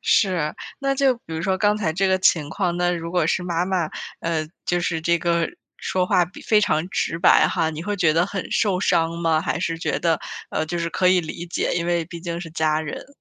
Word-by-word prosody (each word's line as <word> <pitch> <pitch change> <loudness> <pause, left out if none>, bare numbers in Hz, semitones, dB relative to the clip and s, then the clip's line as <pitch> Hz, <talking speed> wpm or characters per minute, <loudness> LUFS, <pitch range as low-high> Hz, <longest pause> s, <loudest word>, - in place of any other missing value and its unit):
是。 175 -7 +2 0.3
那 275 0 +1
就 270 -1 +3
比 235 - -19
如 160 - -3
说 190 +1 +1
刚 205 +1 +2
才 195 -7 -1
这 190 +4 +1
个 190 0 +3
情 165 -5 +2
况， 175 -1 -1
那 175 0 +2
如 170 -1 -3
果 180 -3 +2
是 180 - 0
妈 175 -1 0
妈， 180 -4 0 0.3
呃， 160 -2 -1 0.2
就 175 0 0
是 170 -1 -1
这 170 +1 +2
个 170 -1 +1 0.3
说 185 -1 -1
话 180 - +3
比 180 +3 -13
非 215 -1 +4
常 170 -4 +1
直 165 - -1
白 175 - +6
哈， 160 -1 0
你 155 0 -6
会 205 +3 -2
觉 165 -5 +3
得 165 +3 +2
很 195 -2 -5
受 195 -4 +1
伤 165 -2 +2
吗？ 165 -2 +2
还 170 - -2
是 165 0 -2
觉 - - -1
得， 165 -2 +2 0.3
呃， 155 - -1
就 175 - -3
是 170 0 -2
可 185 +2 +1
以 185 0 +5
理 165 +1 -6
解， 170 - -1
因 170 0 -1
为 170 -1 +1
毕 170 +1 -9
竟 170 0 -4
是 165 -2 -8
家 155 -1 +1
人？ 155 -2 -6
170 Hz, 260 characters per minute, -23 LUFS, 165-185 Hz, 0.3 s, 白